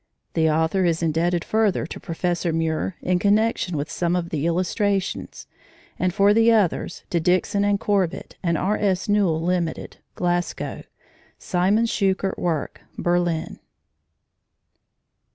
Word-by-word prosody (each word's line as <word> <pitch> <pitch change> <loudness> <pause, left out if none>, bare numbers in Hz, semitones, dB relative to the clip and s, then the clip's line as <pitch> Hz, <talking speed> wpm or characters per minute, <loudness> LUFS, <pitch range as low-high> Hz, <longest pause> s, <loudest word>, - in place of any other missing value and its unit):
The 160 -1 +2
author 160 +4 +1
is 170 -1 +1
indebted 165 +2 0
further 215 -7 +1
to - - -8
Professor 175 -1 -2
Muir 160 +2 -1
in 180 -1 +1
connection 205 -4 +1
with 145 +2 -3
some 175 0 0
of 170 -1 -2
the 155 0 -1
illustrations, 190 +3 -1 0.5
and 185 - +1
for 200 +2 +4
others 220 -6 +2
to 175 - +2
Dixon 180 +4 +1
and 205 0 +2
Corbitt 195 -5 -1
and 170 -3 0
R. 200 +6 0
S. 190 -3 0
Newall, 195 -6 +2
Ltd., 175 -1 -2 0.2
Glasgow; 175 0 -2 0.6
Siemens 200 +5 +1
Schuckert 195 -1 0
Werke, 165 -4 -2 0.2
Berlin. 175 -2 -1
180 Hz, 125 wpm, -23 LUFS, 165-200 Hz, 0.6 s, for